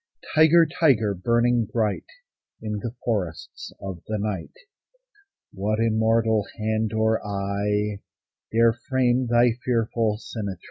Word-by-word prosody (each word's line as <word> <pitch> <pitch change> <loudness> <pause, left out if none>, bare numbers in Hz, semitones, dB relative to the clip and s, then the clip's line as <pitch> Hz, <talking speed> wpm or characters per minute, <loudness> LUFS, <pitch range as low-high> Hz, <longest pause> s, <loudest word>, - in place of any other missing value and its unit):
Tiger, 160 +1 +6
tiger, 120 - +2
burning 120 +4 +1
bright 110 -4 -1 0.5
In 105 -1 -4
the 120 +2 -5
forests 95 -9 -3
of 95 -4 -7
the 110 - -2
night, 100 -5 -4 1.0
What 105 +3 -1
immortal 110 -1 +2
hand 110 0 -1
or 110 0 +1
eye 100 +1 -2 0.5
Dare 115 0 +4
frame 130 0 0
thy 120 +1 +4
fearful 115 -3 0
symmetry? 100 -5 -6
110 Hz, 110 wpm, -24 LUFS, 105-120 Hz, 1.0 s, Tiger